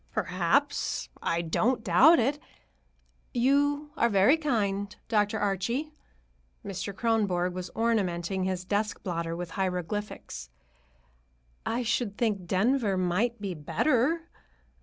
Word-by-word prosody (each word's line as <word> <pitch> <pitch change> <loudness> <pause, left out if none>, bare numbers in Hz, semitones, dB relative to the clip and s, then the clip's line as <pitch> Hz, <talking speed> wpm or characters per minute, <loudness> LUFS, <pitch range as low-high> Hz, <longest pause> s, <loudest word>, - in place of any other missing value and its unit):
"Perhaps; 185 - 0
I 170 +1 0
don't 225 +8 +1
doubt 265 - +6
it. 275 +5 +1 1.0
You 285 +4 +2
are 235 - +2
very 205 +7 +5
kind, 205 -9 -1
Dr. 210 -1 +1
Archie." 220 - -1 0.7
Mr. 195 0 -4
Kronborg 200 -5 0
was 180 0 -5
ornamenting 190 -5 0
his 185 -1 -2
desk 210 +2 -1
blotter 170 -2 -2
with 175 0 -5
hieroglyphics. 180 - -4 1.2
"I 240 +2 0
should 230 -3 -1
think 205 -6 -1
Denver 205 +2 +2
might 185 +7 0
be 200 -2 -3
better. 285 - +1
205 Hz, 110 wpm, -28 LUFS, 185-240 Hz, 1.2 s, doubt